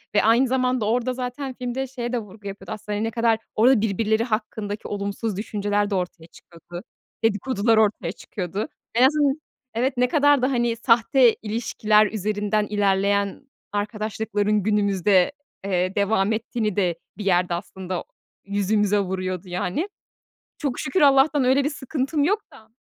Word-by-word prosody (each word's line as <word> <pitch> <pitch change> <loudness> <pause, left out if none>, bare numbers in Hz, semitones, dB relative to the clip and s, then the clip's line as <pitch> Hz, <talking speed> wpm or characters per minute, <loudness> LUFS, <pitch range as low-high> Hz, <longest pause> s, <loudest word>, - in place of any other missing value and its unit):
ve - - +4
aynı 235 +4 +4
zamanda 255 -2 +1
orada 245 +3 0
zaten 255 +2 -4
filmde 250 +2 -3
şeye 245 -2 -5
de 245 - +1
vurgu 210 -1 -11
yapıyordu. 195 0 -8
Aslında, 210 -1 -4
hani, 210 - -1
ne 225 - -2
kadar 230 -1 +2 0.2
orada 235 0 +5
birbirleri 220 +1 +1
hakkındaki 215 -2 -3
olumsuz 200 0 -3
düşünceler 205 -1 -1
de 200 - -1
ortaya 175 -3 -4
çıkıyordu, 175 +2 -12 0.4
dedikodular 225 +1 +2
ortaya 205 -5 +2
çıkıyordu. 195 +1 -5 0.3
En 240 - +5
azın 290 0 +2 0.3
Evet, 255 +2 0
ne 250 0 +3
kadar 290 -1 +4
da, 255 +2 +1
hani, 240 -2 +1
sahte 235 +1 +4
ilişkiler 215 -1 +2
üzerinden 210 0 -1
ilerleyen 200 +1 +1 0.3
arkadaşlıkların 210 0 -1
günümüzde, 200 - +3 0.3
eee, 185 -1 0
devam 200 0 +2
ettiğini 220 -2 -2
de 180 -4 +1 0.2
bir 205 - -6
yerde 180 -2 +2
aslında 185 0 -5 0.4
yüzümüze 205 +1 +1
vuruyordu 185 -1 -3
yani. 180 - -2 0.7
Çok 280 -5 -2
şükür 265 +8 0
Allah'tan 280 0 +5
öyle 265 +2 +3
bir 290 - +1
sıkıntım 285 +1 -2
yok 410 +8 +2
da. 220 -5 -16
215 Hz, 145 wpm, -23 LUFS, 200-250 Hz, 0.7 s, orada